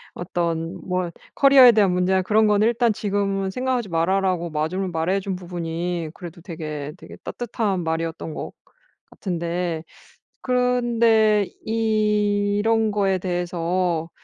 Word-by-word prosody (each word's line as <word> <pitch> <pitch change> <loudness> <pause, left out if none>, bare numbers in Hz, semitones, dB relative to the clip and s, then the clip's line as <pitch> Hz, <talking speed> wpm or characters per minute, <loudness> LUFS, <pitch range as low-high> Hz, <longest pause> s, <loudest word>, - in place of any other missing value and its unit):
어떤 170 -2 -3
뭐 180 -1 -1 0.3
커리어에 275 -3 +8
대한 210 -4 +3
문제나 185 +1 +2
그런 215 +3 +3
거는 210 +1 +3
"일단 235 0 +2
지금은 195 -1 -1
생각하지 250 -1 -1
마라."라고 175 +1 0
마줌을 160 +5 -2
말해 170 +3 0
준 195 -1 -4
부분이 175 -1 -4
그래도 175 -1 -10
되게 155 -4 -6
되게 - - -12
따뜻한 210 -6 -2
말이었던 160 0 -3
것 - - -6 0.6
같은데 170 -2 -3 0.6
그런데 235 -4 +2 0.2
이런 215 0 +1
거에 195 -2 +1
대해서 175 -1 -1
190 Hz, 280 characters per minute, -23 LUFS, 170-215 Hz, 0.6 s, 커리어에